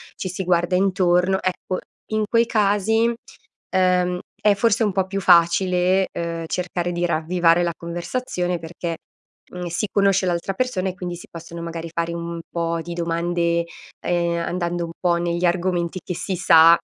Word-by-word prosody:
ci 185 Hz, -, -4 dB
si 185 Hz, +1 st, -4 dB
guarda 175 Hz, 0 st, +2 dB
intorno, 185 Hz, -1 st, +2 dB
ecco, 185 Hz, 0 st, -2 dB, 0.3 s
in 215 Hz, 0 st, +1 dB
quei 230 Hz, 0 st, +4 dB
casi, 220 Hz, +1 st, +2 dB, 0.6 s
uhm, 180 Hz, -1 st, +2 dB, 0.2 s
è 210 Hz, -1 st, +5 dB
forse 225 Hz, +2 st, +2 dB
un 205 Hz, -, +1 dB
po' 190 Hz, -1 st, +1 dB
più 195 Hz, +1 st, -3 dB
facile, 180 Hz, +2 st, +4 dB
uhm, 165 Hz, -1 st, -3 dB
cercare 175 Hz, 0 st, -2 dB
di 175 Hz, 0 st, 0 dB
ravvivare 170 Hz, +1 st, +2 dB
la 170 Hz, -1 st, -1 dB
conversazione 175 Hz, +1 st, -3 dB
perché, 165 Hz, 0 st, -5 dB, 0.6 s
mhmm, 180 Hz, 0 st, -5 dB
si 170 Hz, +5 st, -2 dB
conosce 195 Hz, -2 st, +3 dB
l'altra 175 Hz, +2 st, -1 dB
persona, 195 Hz, -5 st, -1 dB
e 185 Hz, -, -5 dB
quindi 180 Hz, -1 st, -5 dB
si 175 Hz, -, -11 dB
possono 170 Hz, 0 st, -8 dB
magari 165 Hz, 0 st, -5 dB
fare 170 Hz, 0 st, -2 dB
un 170 Hz, 0 st, -5 dB
po' 170 Hz, -1 st, -1 dB
di 170 Hz, +1 st, -6 dB
domande, 170 Hz, 0 st, 0 dB, 0.4 s
ehm, 170 Hz, -1 st, +1 dB
andando 175 Hz, -1 st, -2 dB
un 165 Hz, -, -8 dB
po' 175 Hz, -1 st, +2 dB
negli 170 Hz, +1 st, -1 dB
argomenti 175 Hz, 0 st, 0 dB
che 180 Hz, -, -4 dB
si 190 Hz, +1 st, -3 dB
sa, 165 Hz, -1 st, +7 dB
175 Hz, 165 wpm, -22 LUFS, 170-185 Hz, 0.6 s, sa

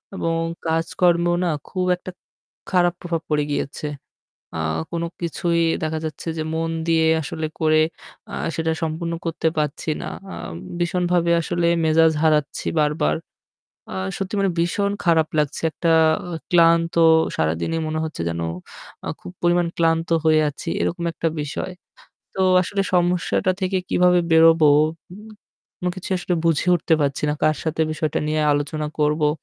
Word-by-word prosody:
এবং 165 Hz, -3 st, -1 dB, 0.3 s
কাজকর্মেও 170 Hz, +1 st, +2 dB
না -, -, +1 dB, 0.2 s
খুব 185 Hz, -1 st, -1 dB
একটা 180 Hz, +1 st, -9 dB, 0.6 s
খারাপ 175 Hz, -2 st, +3 dB
প্রভাব 170 Hz, -2 st, -2 dB
পড়ে 150 Hz, -1 st, +2 dB
গিয়েছে। 145 Hz, +1 st, -3 dB, 0.7 s
আ -, -, -3 dB, 0.3 s
কোনো 170 Hz, 0 st, -2 dB
কিছুই 170 Hz, 0 st, 0 dB, 0.2 s
দেখা 160 Hz, 0 st, -1 dB
যাচ্ছে 155 Hz, +1 st, -6 dB
যে -, -, 0 dB
মন 165 Hz, 0 st, -1 dB, 0.2 s
দিয়ে 165 Hz, -1 st, +3 dB, 0.2 s
আসলে 155 Hz, +2 st, -4 dB
করে 155 Hz, 0 st, +4 dB, 0.5 s
আ -, -, -5 dB, 0.2 s
সেটা 160 Hz, 0 st, 0 dB
সম্পূর্ণ 165 Hz, +1 st, -2 dB
করতে 165 Hz, 0 st, 0 dB
পারছি 150 Hz, +1 st, -2 dB
না। -, -, -5 dB, 0.3 s
আ -, -, -6 dB, 0.4 s
ভীষণভাবে 175 Hz, 0 st, +1 dB
আসলে 170 Hz, +1 st, -1 dB, 0.2 s
মেজাজ 160 Hz, 0 st, +4 dB
হারাচ্ছি 150 Hz, -2 st, +1 dB
বারবার। 150 Hz, +1 st, +1 dB, 0.8 s
আ -, -, -5 dB, 0.2 s
সত্যি 195 Hz, +1 st, -4 dB
মানে 195 Hz, -1 st, +2 dB
ভীষণ 200 Hz, +4 st, +1 dB
খারাপ 165 Hz, -2 st, +3 dB
লাগছে। 150 Hz, -1 st, -1 dB
একটা 165 Hz, +1 st, 0 dB, 0.6 s
ক্লান্ত 165 Hz, -1 st, +4 dB, 0.4 s
সারাদিনই 85 Hz, -, -1 dB
মনে 155 Hz, 0 st, -2 dB
হচ্ছে 155 Hz, -, -5 dB
যেন 85 Hz, 0 st, -3 dB, 0.6 s
আ -, -, -4 dB
খুব -, -, -9 dB
পরিমাণ 175 Hz, 0 st, +2 dB
ক্লান্ত 165 Hz, 0 st, +1 dB, 0.2 s
হয়ে 155 Hz, -1 st, +5 dB
আছি, 145 Hz, +4 st, -7 dB
এরকম 170 Hz, 0 st, -2 dB
একটা 165 Hz, -, -1 dB
বিষয়। 145 Hz, +5 st, -4 dB, 0.6 s
তো -, -, -3 dB, 0.2 s
আসলে 195 Hz, +2 st, -1 dB
সমস্যাটা 180 Hz, +1 st, +2 dB
থেকে 190 Hz, 0 st, 0 dB
কিভাবে 180 Hz, 0 st, +4 dB
বেরোবো, 160 Hz, -1 st, +6 dB, 0.4 s
উ -, -, -9 dB, 0.7 s
কোনো 180 Hz, -, 0 dB
কিছু 185 Hz, -, -7 dB
আসলে 180 Hz, -, -1 dB
বুঝে 165 Hz, 0 st, +2 dB
উঠতে 165 Hz, -1 st, +2 dB
পারছি 140 Hz, -1 st, -1 dB
না। -, -, +2 dB
কার 155 Hz, 0 st, +3 dB
সাথে 160 Hz, 0 st, -2 dB
বিষয়টা 155 Hz, 0 st, -1 dB
নিয়ে 155 Hz, 0 st, 0 dB
আলোচনা 150 Hz, +1 st, -2 dB
করবো, 150 Hz, 0 st, +2 dB
165 Hz, 145 wpm, -22 LUFS, 155-175 Hz, 0.8 s, বেরোবো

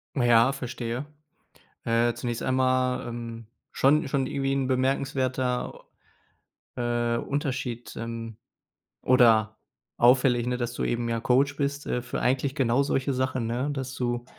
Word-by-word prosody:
Naja, 120 Hz, 0 st, +5 dB
verstehe. 125 Hz, -1 st, -4 dB, 0.8 s
Äh, 115 Hz, 0 st, +2 dB
zunächst 120 Hz, -2 st, -4 dB
einmal, 130 Hz, -1 st, +1 dB
ähm, 115 Hz, -1 st, -7 dB, 0.2 s
schon 150 Hz, +3 st, +3 dB
schon 135 Hz, -1 st, 0 dB
irgendwie 135 Hz, 0 st, -1 dB
'n 135 Hz, -1 st, 0 dB
bemerkenswerter, 130 Hz, -1 st, -1 dB, 0.9 s
äh, 120 Hz, -1 st, 0 dB
Unterschied, 130 Hz, -4 st, -3 dB
ähm 115 Hz, -1 st, -6 dB, 0.7 s
oder 110 Hz, -4 st, +4 dB, 0.4 s
auffällig, 125 Hz, 0 st, +4 dB
ne, 125 Hz, 0 st, 0 dB
dass 120 Hz, -1 st, -3 dB
du -, -, -3 dB
eben, 120 Hz, 0 st, -1 dB
ja, 115 Hz, 0 st, -1 dB
Coach 135 Hz, +4 st, +2 dB
bist, 140 Hz, 0 st, -2 dB
äh, 125 Hz, -, -1 dB
für 120 Hz, -, -5 dB
eigentlich 135 Hz, +2 st, 0 dB
genau 130 Hz, -1 st, +2 dB
solche 135 Hz, 0 st, 0 dB
Sachen, 130 Hz, -2 st, -1 dB
ne, 125 Hz, +5 st, -1 dB
dass 130 Hz, -2 st, -4 dB
du 120 Hz, -1 st, -2 dB
125 Hz, 135 wpm, -26 LUFS, 120-135 Hz, 0.9 s, Naja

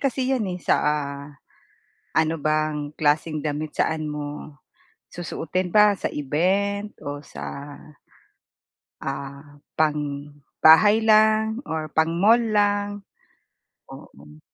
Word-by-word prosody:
kasi 265 Hz, -1 st, 0 dB
'yan, 220 Hz, -7 st, -1 dB
eh, 180 Hz, -, -3 dB
sa, -, -, +1 dB
ah, 140 Hz, -1 st, -2 dB, 0.9 s
ano 160 Hz, +1 st, +2 dB
bang 155 Hz, -1 st, -1 dB
klaseng 155 Hz, +1 st, +1 dB
damit 150 Hz, +1 st, -3 dB
saan 160 Hz, -1 st, 0 dB
mo 150 Hz, 0 st, -7 dB, 0.5 s
susuutin 175 Hz, +1 st, -3 dB
ba 210 Hz, +1 st, +6 dB
sa -, -, -1 dB
event 195 Hz, +8 st, -1 dB
o 145 Hz, 0 st, -5 dB
sa, 145 Hz, 0 st, -8 dB, 1.3 s
ah, 140 Hz, +1 st, -7 dB, 0.2 s
pang 150 Hz, -2 st, -1 dB, 0.3 s
bahay 205 Hz, +8 st, +7 dB
lang 220 Hz, +1 st, +4 dB
or 155 Hz, -1 st, -4 dB
pang 160 Hz, +1 st, +2 dB
mall 215 Hz, +7 st, +5 dB
lang? 205 Hz, -2 st, 0 dB, 0.9 s
Oh, -, -, -11 dB
hmm. 75 Hz, +2 st, -16 dB
155 Hz, 110 wpm, -23 LUFS, 145-205 Hz, 1.3 s, bahay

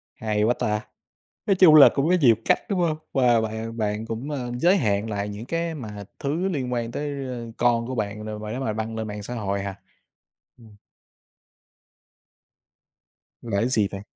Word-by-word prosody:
Hay 105 Hz, -1 st, -1 dB
quá 115 Hz, +3 st, +3 dB
ta! 105 Hz, -2 st, -1 dB, 0.6 s
Nói 195 Hz, -, +3 dB
chung 175 Hz, -4 st, +7 dB
là 150 Hz, -, +10 dB
cũng 140 Hz, +2 st, +1 dB
có 180 Hz, -, +5 dB
nhiều 120 Hz, -5 st, +6 dB
cách, -, -, +4 dB
đúng 195 Hz, -3 st, 0 dB
hông? 165 Hz, -3 st, +1 dB, 0.2 s
Và 120 Hz, -4 st, +4 dB
bạn 110 Hz, +1 st, -4 dB
bạn 105 Hz, 0 st, -2 dB
cũng, 115 Hz, +6 st, -5 dB
a, 145 Hz, -, -2 dB, 0.2 s
giới 180 Hz, +6 st, +4 dB
hạn 105 Hz, -, 0 dB
lại 100 Hz, -1 st, -3 dB
những 105 Hz, +3 st, -7 dB
cái 165 Hz, +3 st, -2 dB
mà 105 Hz, -7 st, -7 dB, 0.2 s
thứ 155 Hz, +7 st, -1 dB
liên 130 Hz, -7 st, -2 dB
quan 115 Hz, -1 st, -2 dB
tới, 140 Hz, 0 st, -4 dB
ơ, 120 Hz, -3 st, -6 dB
con 120 Hz, -1 st, +2 dB
của 130 Hz, -, -4 dB
bạn 105 Hz, -1 st, -3 dB
đồ 110 Hz, 0 st, -5 dB
mà 105 Hz, 0 st, -6 dB
nếu 130 Hz, +4 st, -4 dB
mà 110 Hz, -5 st, -1 dB
đăng 110 Hz, +1 st, -4 dB
lên 110 Hz, -1 st, -3 dB
mạng 105 Hz, -1 st, -6 dB
xã 120 Hz, +4 st, -6 dB
hội 100 Hz, -3 st, -2 dB
hả? 100 Hz, -1 st, -5 dB, 0.8 s
Ừm. 110 Hz, -3 st, -17 dB, 2.7 s
Là 115 Hz, -5 st, -2 dB
cái 120 Hz, -, +1 dB
gì 110 Hz, -6 st, +2 dB
vậy? 100 Hz, -, -6 dB
115 Hz, 195 wpm, -24 LUFS, 105-135 Hz, 2.7 s, là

